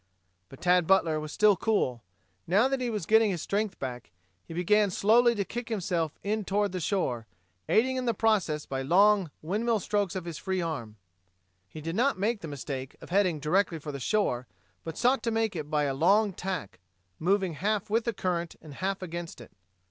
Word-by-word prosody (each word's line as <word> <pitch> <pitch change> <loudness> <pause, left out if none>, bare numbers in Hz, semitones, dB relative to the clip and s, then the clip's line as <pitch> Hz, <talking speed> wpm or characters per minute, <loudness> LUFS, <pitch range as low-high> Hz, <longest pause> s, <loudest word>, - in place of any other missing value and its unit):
But 135 - -13
Tad 180 -2 +3
Butler 170 -5 +3
was 155 0 -6
still 210 +2 +4
cool. 170 - 0 0.5
Now 200 +9 +4
that 270 -1 -1
he 245 - -1
was 210 -7 -3
getting 220 +2 +5
his 175 -5 -3
strength 205 -1 -1
back, 125 -3 -6 0.3
he - - -14
began 200 +5 +3
slowly 235 +5 +4
to 200 -2 -1
kick 240 +3 -6
himself 175 -7 -1
in 215 +1 -1
toward 200 0 0
shore, 130 - -1 0.4
aiding 260 +4 +3
in 255 - -2
the 235 -2 +1
process 190 -9 +1
by 135 -1 -3
long 195 +5 +4
windmill 215 +7 0
strokes 200 -1 -1
of 185 -2 -4
his 170 -4 -6
free 190 0 -2
arm. 140 -11 -4 0.7
He 155 - -9
did 165 +3 -4
not 255 +3 +2
make 215 +3 0
the 165 - -6
mistake 135 -2 -6
of - - -12
heading 185 -5 +2
directly 170 +4 +1
for 150 -1 -6
the 140 - -6
shore, 125 - 0 0.4
but 165 -1 -6
sought 250 +1 +3
to 230 - -1
make 225 -3 0
it 150 -3 -5
by 150 -1 +1
a 140 -2 0
long 195 +8 +3
tack, 180 - -5 0.4
moving 190 0 +1
half 205 +6 -1
with 225 +2 +1
the 235 - +1
current 175 -3 -2
and 155 -3 -12
half 190 +5 -3
against 170 -3 -6
it. 120 - -13
190 Hz, 195 wpm, -28 LUFS, 155-215 Hz, 0.7 s, getting